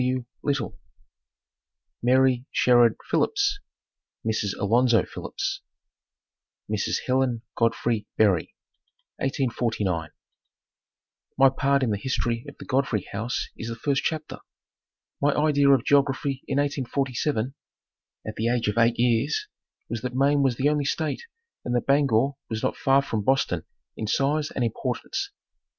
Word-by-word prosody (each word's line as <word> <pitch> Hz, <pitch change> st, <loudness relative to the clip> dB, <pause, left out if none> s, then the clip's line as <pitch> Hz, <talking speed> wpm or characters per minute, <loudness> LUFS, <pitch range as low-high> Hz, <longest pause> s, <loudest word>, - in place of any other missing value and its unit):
W. 125 Hz, -1 st, 0 dB, 0.2 s
Little) 140 Hz, -6 st, -2 dB, 1.2 s
MARY 130 Hz, 0 st, +3 dB
SHERRARD 120 Hz, -2 st, +4 dB, 0.2 s
PHILLIPS 405 Hz, -1 st, +1 dB, 0.7 s
(Mrs. 110 Hz, -3 st, -1 dB
Alonzo 120 Hz, +3 st, +3 dB
Phillips) 390 Hz, 0 st, -4 dB, 1.1 s
Mrs. -, -, -1 dB
Helen 130 Hz, -3 st, +1 dB
Godfrey 115 Hz, -1 st, 0 dB
Berry 100 Hz, -6 st, +2 dB, 0.6 s
1849. 115 Hz, -, -1 dB, 1.3 s
My 135 Hz, 0 st, +7 dB
part 140 Hz, +1 st, +1 dB
in 120 Hz, -, +1 dB
the 100 Hz, -, -1 dB
history 120 Hz, -2 st, -1 dB
of -, -, -15 dB
the -, -, -10 dB
Godfrey 125 Hz, -7 st, 0 dB
house 110 Hz, +5 st, -3 dB
is 115 Hz, -, -6 dB
the 115 Hz, -, -4 dB
first 140 Hz, +4 st, 0 dB
chapter. 155 Hz, -1 st, -3 dB, 0.8 s
My 145 Hz, 0 st, +3 dB
idea 145 Hz, -2 st, +3 dB
of 135 Hz, -2 st, +4 dB
geography 140 Hz, -1 st, +2 dB
in 135 Hz, -, -1 dB
1847 135 Hz, -2 st, -1 dB, 0.7 s
at 110 Hz, -, -4 dB
the 110 Hz, -, 0 dB
age 120 Hz, -2 st, 0 dB
of 105 Hz, +3 st, 0 dB
eight 115 Hz, 0 st, +3 dB
years 120 Hz, -, +1 dB, 0.4 s
was 115 Hz, -2 st, -4 dB
that 125 Hz, +1 st, -4 dB
Maine 140 Hz, +2 st, +3 dB
was 135 Hz, -3 st, +2 dB
the 135 Hz, +4 st, +1 dB
only 150 Hz, -1 st, 0 dB
state 155 Hz, +2 st, -1 dB, 0.4 s
and 120 Hz, -, -1 dB
that 120 Hz, -, 0 dB
Bangor 140 Hz, -2 st, +3 dB, 0.2 s
was 110 Hz, -1 st, -3 dB
not -, -, 0 dB
far 135 Hz, 0 st, +3 dB
from 110 Hz, -6 st, -2 dB
Boston 100 Hz, -8 st, +1 dB, 0.3 s
in 110 Hz, -, -4 dB
size 145 Hz, +6 st, +1 dB
and 130 Hz, -, -2 dB
importance. 115 Hz, -, -2 dB
130 Hz, 135 wpm, -25 LUFS, 115-140 Hz, 1.3 s, My